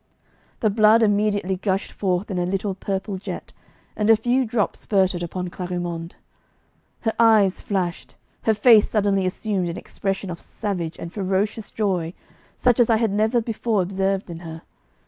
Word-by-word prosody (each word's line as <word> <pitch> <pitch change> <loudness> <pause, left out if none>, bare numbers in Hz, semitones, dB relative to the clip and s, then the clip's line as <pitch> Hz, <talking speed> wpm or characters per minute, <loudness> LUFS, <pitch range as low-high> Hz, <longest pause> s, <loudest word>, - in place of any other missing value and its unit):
The 215 - +3
blood 215 +2 +5
immediately 205 -2 +1
gushed 190 0 -1
forth 190 0 -1
in 185 - -1
a 175 - 0
little 195 +1 -1
purple 195 +1 -3
jet, - - -7 0.4
and 210 0 0
a 225 - +8
few 245 +3 +1
drops 220 -2 -1
spurted 190 -3 +1
upon 180 +1 -4
Clarimonde. 175 -2 -4 0.9
Her 225 -1 0
eyes 215 -4 +4
flashed, 180 -4 -3 0.3
her 220 - +3
face 215 0 +6
suddenly 200 -3 +1
assumed 185 -1 -2
an 170 - -5
expression 195 -1 -3
of 170 - -7
savage 175 -5 -4
and 170 - -7
ferocious 200 +2 -1
joy 185 -6 -1 0.4
such 245 -1 +2
as 240 - +4
I 225 - +5
had 225 -2 +1
never 220 +4 +2
before 220 -2 0
observed 195 0 -1
in 165 - -7
her. 165 -1 -9
195 Hz, 160 wpm, -23 LUFS, 180-215 Hz, 0.9 s, a